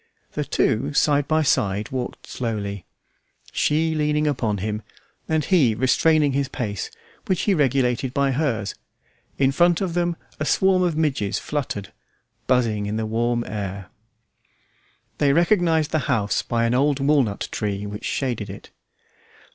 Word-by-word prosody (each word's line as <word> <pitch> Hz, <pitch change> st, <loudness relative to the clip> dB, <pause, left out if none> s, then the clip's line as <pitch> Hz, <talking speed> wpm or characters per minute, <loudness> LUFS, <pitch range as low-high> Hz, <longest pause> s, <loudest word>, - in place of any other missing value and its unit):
The -, -, -2 dB
two, 140 Hz, +7 st, 0 dB
side 145 Hz, -1 st, +3 dB
by 155 Hz, 0 st, +2 dB
side 105 Hz, -6 st, +1 dB
walked 130 Hz, -2 st, -4 dB
slowly, 100 Hz, -5 st, -4 dB, 0.6 s
she 160 Hz, +2 st, +1 dB
leaning 150 Hz, 0 st, +1 dB
upon 120 Hz, -8 st, 0 dB
him, 105 Hz, +2 st, -3 dB, 0.5 s
and 160 Hz, -2 st, +1 dB
he 140 Hz, -, +3 dB
restraining 145 Hz, +5 st, +3 dB
his 140 Hz, 0 st, 0 dB
pace, 105 Hz, -7 st, -4 dB, 0.4 s
which 185 Hz, -, +1 dB
he 205 Hz, -, +2 dB
regulated 130 Hz, -4 st, +1 dB
by 140 Hz, +1 st, +1 dB
hers; 125 Hz, -8 st, -1 dB, 0.6 s
in 135 Hz, -1 st, +3 dB
front 175 Hz, +4 st, +3 dB
of 185 Hz, -4 st, -2 dB
them 175 Hz, 0 st, 0 dB, 0.2 s
a 155 Hz, -, -1 dB
swarm 190 Hz, +3 st, +3 dB
of 175 Hz, -4 st, +1 dB
midges 135 Hz, -11 st, 0 dB
fluttered, 125 Hz, -9 st, -4 dB, 0.5 s
buzzing 115 Hz, -5 st, +1 dB
in 105 Hz, -, -2 dB
the 110 Hz, -, -1 dB
warm 120 Hz, +2 st, 0 dB
air. 100 Hz, -3 st, -5 dB, 1.3 s
They 140 Hz, -1 st, +4 dB
recognized 170 Hz, -2 st, +3 dB
the 155 Hz, -, +2 dB
house 105 Hz, -6 st, +1 dB
by 115 Hz, -1 st, 0 dB
an 115 Hz, -, +1 dB
old 140 Hz, +2 st, +2 dB
walnut 135 Hz, -7 st, +1 dB
tree 100 Hz, -1 st, -2 dB
which 105 Hz, +2 st, -7 dB
shaded 120 Hz, -6 st, -2 dB
it. 100 Hz, -, -10 dB
130 Hz, 145 wpm, -23 LUFS, 110-155 Hz, 1.3 s, They